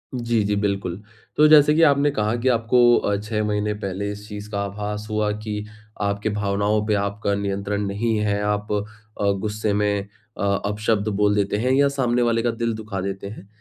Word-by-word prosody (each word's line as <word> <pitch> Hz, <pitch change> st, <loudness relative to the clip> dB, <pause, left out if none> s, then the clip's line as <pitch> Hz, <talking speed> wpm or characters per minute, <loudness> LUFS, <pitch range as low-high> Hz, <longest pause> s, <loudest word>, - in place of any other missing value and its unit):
जी, 120 Hz, -3 st, 0 dB
जी। 105 Hz, 0 st, 0 dB
बिल्कुल। 100 Hz, -2 st, -2 dB, 0.4 s
तो 150 Hz, -, +7 dB
जैसे 150 Hz, -1 st, +7 dB
कि 165 Hz, -, +3 dB
आपने 145 Hz, -1 st, +4 dB
कहा, 110 Hz, -3 st, 0 dB
कि 120 Hz, +2 st, -2 dB
आपको 120 Hz, +1 st, +4 dB
अ, 100 Hz, -, 0 dB
6 105 Hz, 0 st, -2 dB
महीने 105 Hz, 0 st, 0 dB
पहले 100 Hz, -1 st, -4 dB
इस 105 Hz, +1 st, -9 dB
चीज़ 105 Hz, 0 st, -8 dB
का 100 Hz, -, -2 dB
आभास 105 Hz, +1 st, -5 dB
हुआ 105 Hz, -1 st, 0 dB
कि 105 Hz, -1 st, -5 dB, 0.4 s
आपकी 100 Hz, +1 st, -1 dB
भावनाओं 105 Hz, +1 st, 0 dB
पे 105 Hz, -, +1 dB
आपका 100 Hz, 0 st, -1 dB
नियंत्रण 100 Hz, 0 st, -2 dB
नहीं 110 Hz, +3 st, -1 dB
है। 100 Hz, 0 st, 0 dB
आप 105 Hz, 0 st, -1 dB
अ, 105 Hz, 0 st, -3 dB
गुस्से 105 Hz, 0 st, -2 dB
में 100 Hz, -1 st, 0 dB, 0.3 s
अ, -, -, -3 dB, 0.2 s
अपशब्द 105 Hz, 0 st, 0 dB
बोल 105 Hz, 0 st, +3 dB
देते 100 Hz, 0 st, 0 dB
हैं 125 Hz, +4 st, 0 dB
या 140 Hz, +1 st, +4 dB
सामने 125 Hz, -2 st, +1 dB
वाले 115 Hz, -1 st, +2 dB
का 120 Hz, -, +1 dB
दिल 115 Hz, 0 st, -2 dB
दुखा 110 Hz, -3 st, -5 dB
देते 100 Hz, +1 st, -4 dB
हैं। 100 Hz, -1 st, -10 dB
105 Hz, 195 wpm, -22 LUFS, 100-115 Hz, 0.4 s, तो